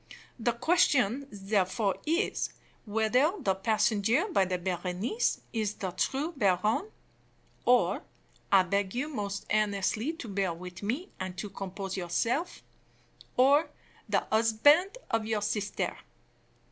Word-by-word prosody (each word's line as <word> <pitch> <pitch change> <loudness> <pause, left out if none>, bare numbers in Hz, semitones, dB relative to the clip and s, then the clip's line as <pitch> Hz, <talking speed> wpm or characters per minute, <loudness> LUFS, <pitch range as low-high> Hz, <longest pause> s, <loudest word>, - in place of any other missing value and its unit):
The 235 +1 +1
question, 270 - +2
therefore, 195 0 0
is, 335 +7 0 0.4
whether 225 - +2
the 195 - +1
passenger 220 - +2
by 195 - +3
the 180 0 -1
Berenice 180 - -1
is 215 -3 -1
the 190 -2 -4
true 270 - -1
baron, 215 - +1 0.8
or 250 0 +3 0.5
I 195 -1 +7
beg 195 +2 -1
you 275 +5 -1
most 200 -7 -4
earnestly 215 - +1
to 325 -8 -8
bear 195 -4 -1
with 180 +1 -9
me 250 - -2
and 185 -1 -5
to 200 +2 -5
compose 195 0 -5
yourself 230 - -1 0.7
or 280 +5 +5 0.4
the - - +3
husband 290 - +4
of 225 -2 0
your 215 -2 0
sister. 205 -1 -2
215 Hz, 120 wpm, -29 LUFS, 195-255 Hz, 0.8 s, I